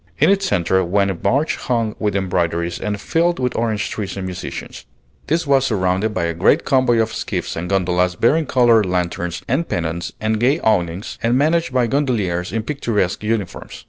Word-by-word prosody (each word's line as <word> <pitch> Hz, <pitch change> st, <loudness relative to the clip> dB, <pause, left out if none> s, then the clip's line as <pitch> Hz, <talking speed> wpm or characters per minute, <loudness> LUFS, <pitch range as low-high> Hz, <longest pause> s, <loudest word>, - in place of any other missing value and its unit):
In 155 Hz, +7 st, +4 dB
its 195 Hz, -1 st, +1 dB
centre 95 Hz, -, +1 dB
went 100 Hz, +2 st, +1 dB
a -, -, -1 dB
barge 140 Hz, -, 0 dB
hung 115 Hz, -3 st, -1 dB
with 105 Hz, -2 st, -1 dB
embroideries 85 Hz, -3 st, -1 dB
and 105 Hz, -1 st, -3 dB
filled 170 Hz, -, +1 dB
with 125 Hz, -1 st, -1 dB
orange 110 Hz, -2 st, -1 dB
trees 100 Hz, -2 st, -4 dB
and 95 Hz, -, -4 dB
musicians. 95 Hz, 0 st, -7 dB, 0.4 s
This 165 Hz, +2 st, 0 dB
was 135 Hz, -2 st, +3 dB
surrounded 95 Hz, -1 st, 0 dB
by 90 Hz, -4 st, -2 dB
a 85 Hz, 0 st, -1 dB
great 95 Hz, -, +2 dB
convoy 130 Hz, -4 st, +3 dB
of 110 Hz, 0 st, +1 dB
skiffs -, -, -3 dB
and 90 Hz, +2 st, -4 dB
gondolas 90 Hz, -2 st, +1 dB
bearing 145 Hz, -, +2 dB
colored 120 Hz, -6 st, +4 dB
lanterns 90 Hz, -1 st, -2 dB
and 150 Hz, +8 st, 0 dB
pennons 85 Hz, 0 st, -3 dB
and 110 Hz, 0 st, 0 dB
gay 135 Hz, +7 st, +2 dB
awnings, 90 Hz, -3 st, 0 dB
and 120 Hz, +2 st, +2 dB
managed 160 Hz, +2 st, +2 dB
by 125 Hz, -1 st, +2 dB
gondoliers 110 Hz, -10 st, -1 dB
in 110 Hz, +2 st, -2 dB
picturesque 115 Hz, -9 st, -1 dB
uniforms. 105 Hz, -4 st, -3 dB
105 Hz, 180 wpm, -19 LUFS, 90-130 Hz, 0.4 s, In